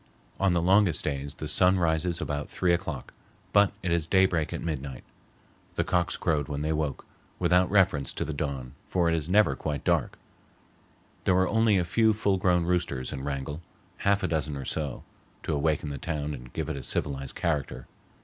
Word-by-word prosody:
On 95 -2 +3
the 85 -1 +1
longest 95 -2 +4
days 70 0 -3
the 75 - -5
sun 90 +5 +4
rises 85 0 +1
about 75 -1 -3
three 90 -1 +1
o'clock, 85 -7 -3 0.4
but 100 -1 +5
it 90 - -1
is 85 -2 +1
daybreak 90 -4 +2
at - - -3
midnight. 70 -6 -4 0.7
The - - +1
cocks 90 -1 0
crowed 75 -4 0
when 75 -1 -3
they 80 +1 0
woke, 75 -2 -2 0.3
without 90 +1 +3
reference 95 -9 +3
to - - -3
the 80 - -4
dawn, 70 -4 -4
for 85 -2 +2
it - - +1
is 80 0 -3
never 100 -8 +4
quite 75 -1 -3
dark; - - +1 1.1
there 90 - +4
were 95 0 +3
only 110 -1 +3
a 90 - +1
few 110 +5 +3
full 105 -2 +1
grown 90 -2 +2
roosters 85 -8 -1
in 65 0 -5
Wrangell, 70 +2 -4 0.4
half 100 0 +1
a - - +2
dozen 75 -3 -2
or 70 - -6
so, 75 -3 -3 0.4
to 80 - -1
awaken 75 +1 0
the 70 - -5
town 75 -1 -3
and 65 -3 -9
give - - -3
it - - -3
a - - -5
civilized 70 +1 -2
character. 70 -6 -2
80 Hz, 190 wpm, -28 LUFS, 70-90 Hz, 1.1 s, but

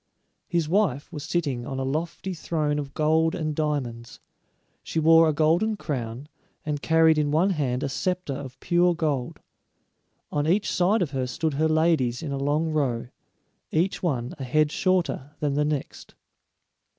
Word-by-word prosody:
His 170 -5 0
wife 165 -6 0
was 150 - -5
sitting 145 -7 -2
on 135 - -4
a 135 - -1
lofty 160 +7 -3
throne 155 -3 -1
of 140 -2 -6
gold 160 +2 +2
and 155 -4 -2
diamonds; 130 -7 -3 0.6
she 160 - -3
wore 165 +1 +6
a - - +1
golden 170 +9 +2
crown, 125 - -4 0.4
and 150 -2 -2
carried 160 -1 +4
in 150 -1 +1
one 165 +7 +3
hand 135 -7 -1
a - - 0
scepter 180 +2 -2
of 135 -1 -8
pure 175 0 +2
gold. 145 -6 -2 0.9
On 145 0 0
each 195 +5 +2
side 185 +3 +2
of 150 - -4
her 130 -2 -2
stood 155 +4 -2
her 155 +3 +1
ladies 155 -5 +2
in 150 - -4
a 140 - -2
long 150 +3 0
row, 125 -6 -1 0.6
each 175 +5 0
one 130 -8 -1
a - - -4
head 150 +4 +2
shorter 175 -7 0
than 145 -2 0
the 150 +1 +1
next. 150 -2 -4
155 Hz, 165 wpm, -25 LUFS, 140-165 Hz, 0.9 s, wore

